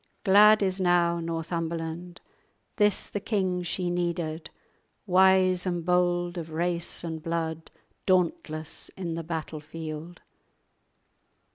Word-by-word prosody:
Glad 210 +1 +6
is 190 0 0
now 175 -1 +3
Northumberland, 165 +1 -4 0.6
This 210 -3 +3
the 205 - -4
king 190 -4 -1
she 175 0 -2
needed, 170 -2 -2 0.6
Wise 185 -1 +4
and 175 -2 -2
bold 175 0 +1
of 165 -1 -7
race 170 +2 -2
and 160 -2 -5
blood, 165 -1 -3 0.4
Dauntless 165 -4 0
in 175 -3 -3
the 165 - -3
battle 160 -1 -5
field!" 160 +2 -8
175 Hz, 110 wpm, -27 LUFS, 165-185 Hz, 0.6 s, Glad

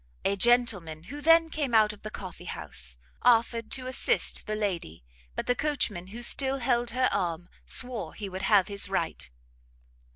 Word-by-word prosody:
A 200 - +2
gentleman, 200 -8 +2
who 285 +11 -9
then 330 +1 +5
came 280 -7 -1
out 215 -1 +4
of 210 - -16
the 215 - -6
coffee 185 -4 -9
house, 65 - -6 0.2
offered 230 -1 +2
to 260 -1 -3
assist 255 0 +1
the 215 - -2
lady, 180 - -3 0.3
but - - -3
the 245 - +2
coachman, 245 -11 -1
who 230 +5 -8
still 270 +2 +3
held 240 -2 0
her 255 +2 +1
arm, 175 -1 -2 0.2
swore 240 -10 -1
he 205 - -6
would 190 0 -6
have 195 -1 +4
his 200 -1 +2
right. 165 - -2
215 Hz, 170 wpm, -28 LUFS, 185-245 Hz, 0.3 s, then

